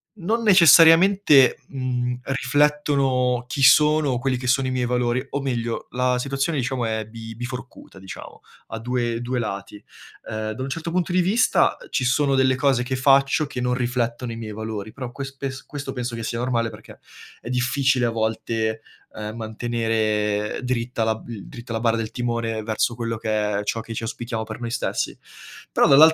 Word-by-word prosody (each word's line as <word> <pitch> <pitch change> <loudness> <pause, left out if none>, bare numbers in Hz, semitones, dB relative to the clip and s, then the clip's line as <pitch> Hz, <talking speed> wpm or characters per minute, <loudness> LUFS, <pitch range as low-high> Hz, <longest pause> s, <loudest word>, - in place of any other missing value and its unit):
non 215 +5 -1
necessariamente, 170 - +7
mhmm, 125 -2 -2
riflettono 135 -2 +1
chi 135 +1 -2
sono, 150 -3 +5
quelli 130 0 0
che 125 - -7
sono 130 +1 +2
i 130 - -2
miei 125 -1 0
valori, 125 +1 0
o 140 - -2
meglio 120 -4 -3
la 125 0 +1
situazione, 140 +4 -1
diciamo, 125 -1 -1
è 110 -1 -2
bi 115 0 -9
biforcuta, 125 -3 -8
diciamo, 95 0 -10 0.3
a 115 - -6
2- 120 0 -2
2 125 +1 -2
lati. 100 -2 -5 0.5
Ehm, 110 0 -3
da 110 - -7
un 135 - -4
certo 165 +4 -4
punto 180 0 0
di 180 +1 +3
vista, 195 +7 +3
uhm, - - -12
ci 130 - -1
sono 140 +2 +2
delle 130 0 +3
cose 135 -2 +2
che 130 +1 -2
faccio 135 +3 +3
che 130 - -6
non 125 0 0
riflettono 120 -1 -2
i - - -5
miei 110 -2 -6
valori, 110 -1 -5
però 125 -3 -6
ques 135 +1 -7
pes 135 -1 -6
questo 145 -1 -6
penso 125 -2 -4
che 115 - -5
sia 115 - -3
normale 120 -2 0
perché - - -13 0.4
è 120 - -8
difficile 130 0 +1
a 115 - +1
volte, 110 0 -2 0.3
uhm, 105 0 -6
mantenere 110 -2 -1
dritta 120 -2 -1
la 110 0 +1
b 110 0 -9
dritta 120 +2 -9
la 115 - -1
barra 115 0 +1
del 110 -1 -4
timone 115 -2 -2
verso 110 +2 0
quello 115 -1 -3
che 105 -2 -1
è - - -6
ciò 115 +2 -2
che 115 0 -8
ci - - -4
auspichiamo 115 0 -4
per 110 0 -8
noi 120 -1 -4
stessi. 120 - -2 0.5
Però - - +4
dall'al 155 +4 +8
125 Hz, 185 wpm, -23 LUFS, 115-135 Hz, 0.5 s, dall'al